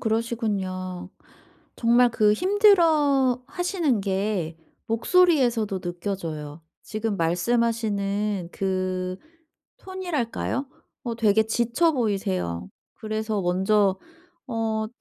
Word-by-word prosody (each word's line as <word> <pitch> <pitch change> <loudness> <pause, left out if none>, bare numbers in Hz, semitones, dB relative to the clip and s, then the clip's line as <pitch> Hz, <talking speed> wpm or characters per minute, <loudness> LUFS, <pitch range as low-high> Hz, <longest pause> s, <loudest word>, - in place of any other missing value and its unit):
그러시군요. 200 -6 -2 0.7
정말 240 +1 +4
그 215 -2 +3
힘들어하시는 315 - +2
게 190 -4 -1 0.3
목소리에서도 235 - +2
느껴져요. 170 -4 -5 0.2
지금 215 -1 -3
말씀하시는 205 0 0
그 185 -1 -2 0.6
톤이랄까요? 320 -8 -3 0.4
어 235 -2 -2
되게 220 -1 +3
지쳐 240 +9 +1
보이세요. 190 - -2 0.3
그래서 215 -1 -3
먼저 190 +2 +2 0.5
어 225 -3 -1
215 Hz, 210 characters per minute, -25 LUFS, 190-245 Hz, 0.7 s, 정말